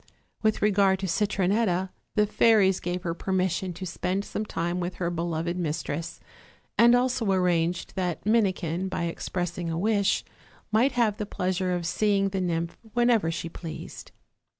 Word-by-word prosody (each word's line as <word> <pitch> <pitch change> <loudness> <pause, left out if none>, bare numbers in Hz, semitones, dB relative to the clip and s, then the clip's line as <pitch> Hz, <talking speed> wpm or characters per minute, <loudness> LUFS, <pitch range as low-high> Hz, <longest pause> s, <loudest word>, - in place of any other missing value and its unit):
With 215 -2 +1
regard 200 -2 +4
to - - -1
Citronetta, 190 0 +1 0.2
the 210 - +4
fairies 205 -3 +4
gave 180 0 -3
her 170 -3 -1
permission 185 0 -1
to 185 +2 -7
spend 185 +3 -2
some 215 - -3
time 175 0 -2
with 180 +1 -3
her 175 -1 -2
beloved 170 0 -2
mistress, 165 -1 -3 0.6
and 235 +1 +6
also 245 -4 +1
arranged 175 -2 +1
that 180 -2 -2
Minikin, 190 -5 +1
by 185 - -2
expressing 175 0 -3
a 165 - -2
wish, 200 +1 +1 0.5
might 235 +6 +3
have 230 -4 +2
the 210 - -4
pleasure 185 -1 -1
of 175 -1 -1
seeing 195 +3 +2
the 190 -1 -2
nymph 170 -1 -2
whenever 240 -7 +3
she 165 0 -3
pleased. 165 -1 -8
185 Hz, 150 wpm, -27 LUFS, 175-205 Hz, 0.6 s, and